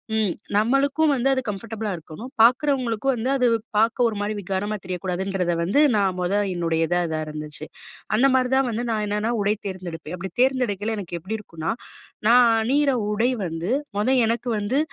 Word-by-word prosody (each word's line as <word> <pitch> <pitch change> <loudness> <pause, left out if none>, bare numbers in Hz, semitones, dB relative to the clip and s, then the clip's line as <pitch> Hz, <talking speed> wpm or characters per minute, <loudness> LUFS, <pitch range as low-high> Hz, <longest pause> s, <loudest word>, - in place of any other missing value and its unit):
ம். 210 -5 +1 0.2
நம்மளுக்கும் 275 +7 +3
வந்து 260 0 0
அது 260 -1 +1
கம்ஃபர்டபுளா 210 +1 -4
இருக்கணும். 165 +9 -9
பார்க்குறவங்களுக்கும் 255 0 +3
வந்து 240 +3 -2
அது 250 -2 +2
வ் - - +3 0.2
பார்க்க 230 +2 +3
ஒரு 220 - -2
மாரி 210 +1 -1
விகாரமா 195 +2 -2
தெரியக்கூடாதுன்றத 185 0 -2
வந்து 190 +12 +2 0.2
நான் 195 -3 +1
முத 180 +2 -1 0.2
என்னுடையதா 165 0 0
இதா 160 -1 -2
இருந்துச்சு. 150 0 -7 0.5
அந்த 265 +5 +5
மாரி 255 -1 +2
தான் 265 -1 +3
வந்து 230 +1 -2
நான் 215 -1 0
என்னன்னா, 210 +3 -1
உடை 205 +1 +2
தேர்ந்தெடுப்பேன். 175 -4 -6
அப்பிடி 185 0 -6
தேர்ந்தெடுக்கையில 225 -5 +1
எனக்கு 175 -4 -5
எப்பிடி 210 +6 -4
இருக்கும்ன்னா, 165 -3 -4 0.6
நான் 245 +1 +7
அணியிற 275 +4 +2 0.2
உடை 225 +4 +2 0.2
வந்து 165 +5 -3 0.3
முத 255 +5 +2
எனக்கு 235 +2 -1
வந்து 235 +8 0
210 Hz, 165 wpm, -23 LUFS, 180-245 Hz, 0.6 s, நான்